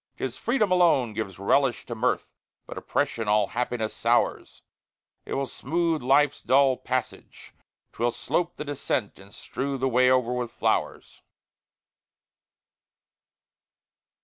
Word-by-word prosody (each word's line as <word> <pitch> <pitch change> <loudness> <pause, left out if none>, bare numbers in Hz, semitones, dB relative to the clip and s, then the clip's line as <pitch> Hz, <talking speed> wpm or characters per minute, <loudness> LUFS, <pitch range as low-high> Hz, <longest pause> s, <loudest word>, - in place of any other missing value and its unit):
'Tis - - -3
freedom 215 -8 0
alone 165 -11 +3
gives 105 -4 -5
a 100 - -10
relish 135 +3 +2
to 120 - -5
mirth, 110 - -1 0.3
But - - -9
oppression 115 -2 -2
all 105 0 +2
happiness 120 -2 -2
sours; - - 0 0.6
It - - -3
will 140 - -1
smooth 165 +4 -1
life's 140 +3 +3
dull 135 0 +4
passage, 130 -1 -5 0.4
'twill 120 +1 0
slope 170 +9 -2
the 150 - -6
descent, 130 -8 -3
And 100 +1 -15
strew 135 +6 -4
the 135 +1 0
way 125 0 +4
over 125 -1 +2
with 125 -1 -2
flowers. - - -2
130 Hz, 125 wpm, -26 LUFS, 115-140 Hz, 0.6 s, dull